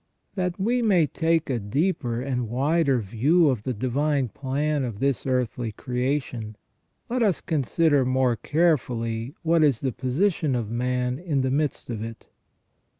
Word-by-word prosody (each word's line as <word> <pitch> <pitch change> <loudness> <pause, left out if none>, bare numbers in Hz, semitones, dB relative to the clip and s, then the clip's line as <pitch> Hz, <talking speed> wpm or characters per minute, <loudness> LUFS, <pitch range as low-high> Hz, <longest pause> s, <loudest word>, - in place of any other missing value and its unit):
That 180 -1 -2
we 240 +6 +1
may 190 -8 +4
take 165 +2 0
a 125 -3 -1
deeper 120 - -1
and 125 -3 -2
wider 140 +3 +2
view 140 - +3
of 125 -6 0
the 130 - -3
divine 135 +3 0
plan 145 +4 -1
of 115 -5 -4
this 135 +2 0
earthly 125 -3 -1
creation, 125 -3 -3 0.5
let 250 +1 -1
us 200 -7 +2
consider 150 0 +2
more 130 -1 +2
carefully 125 -5 0
what 165 -1 +3
is 140 -7 +3
the 130 - 0
position 145 - 0
of 115 -3 -3
man 125 +1 -1
in 160 -6 -1
the 130 0 0
midst 145 -3 -1
of 110 -2 -4
it. 115 0 -9
135 Hz, 150 wpm, -25 LUFS, 120-160 Hz, 0.5 s, may